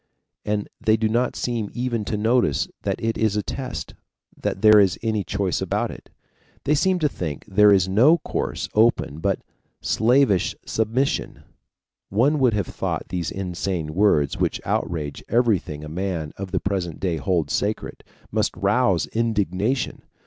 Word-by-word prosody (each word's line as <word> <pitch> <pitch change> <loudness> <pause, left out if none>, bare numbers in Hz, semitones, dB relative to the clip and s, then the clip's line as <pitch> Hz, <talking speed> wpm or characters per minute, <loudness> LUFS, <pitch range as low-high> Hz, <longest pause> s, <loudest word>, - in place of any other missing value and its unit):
And 105 -1 -1 0.2
they 110 0 +4
do 110 0 +1
not 120 +3 0
seem 115 -4 -2
even 120 -3 -1
to 105 - -2
notice 110 - +2
that - - -2
it 115 0 -2
is 110 -2 +2
a 105 - 0
test, 110 - -5 0.4
that 95 - -4
there 110 -1 +8
is 95 -3 +3
any 110 -3 0
choice 95 -3 -1
about - - -1
it. - - -12 0.5
They 145 - +2
seem 185 +5 +2
to 155 -4 +2
think 80 - -5
there 105 +1 +5
is 95 -2 +4
no 120 - +5
course - - -3
open 110 -9 +2
but 95 +3 -1 0.4
slavish 115 -4 +2
submission. 115 +5 -1 0.7
One 135 +9 +2
would 125 -5 +3
have 100 -3 0
thought - - -4
these 90 -3 -2
insane 90 -4 -3
words, 80 -7 +2
which - - 0
outrage 75 -4 -2
everything 105 -11 +1
a - - -7
man 85 -2 -3
of 100 -1 -6
the 95 0 0
present 95 -4 -3
day 90 -4 -1
holds 80 -2 0
sacred, - - -2 0.3
must - - 0
rouse - - +2
indignation. 110 - -1
105 Hz, 155 wpm, -23 LUFS, 90-115 Hz, 0.7 s, there